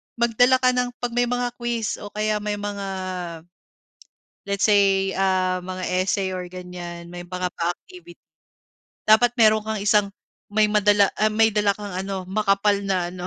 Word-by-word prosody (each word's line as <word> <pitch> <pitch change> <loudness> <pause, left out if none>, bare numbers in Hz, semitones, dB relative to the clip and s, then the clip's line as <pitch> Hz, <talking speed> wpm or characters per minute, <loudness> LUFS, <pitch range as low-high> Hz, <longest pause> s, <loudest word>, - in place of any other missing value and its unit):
magdala 240 +2 +3
ka 255 0 +3
ng 250 0 -1
'pag 240 - -1
may 245 +1 +1
mga 245 0 -1
quiz 235 -2 -2
o 205 - -8
kaya 215 0 0
may 210 0 -3
mga 205 -1 -5 1.6
let's 200 +1 0
say, 195 -2 +3
ah, 185 -1 +1
mga 185 0 -5 0.2
essay, 195 -1 0
or 180 - -5
ganyan 175 -1 -8
may 175 0 -8
mga 180 0 -3
pa-activity. 345 - -6 0.9
Dapat 235 +3 +5
meron 215 -1 +5
kang 220 -1 -3
isang 205 -1 +3 0.4
may 215 +1 +3
madala, 205 -1 +4
ah, 215 0 +3
may 220 +1 +3
dala 205 -1 +2
kang 205 -2 -7
ano 190 0 -4
makapal 200 0 +2
na 185 -3 -1
ano, 180 0 -7
205 Hz, 160 wpm, -23 LUFS, 185-220 Hz, 1.6 s, Dapat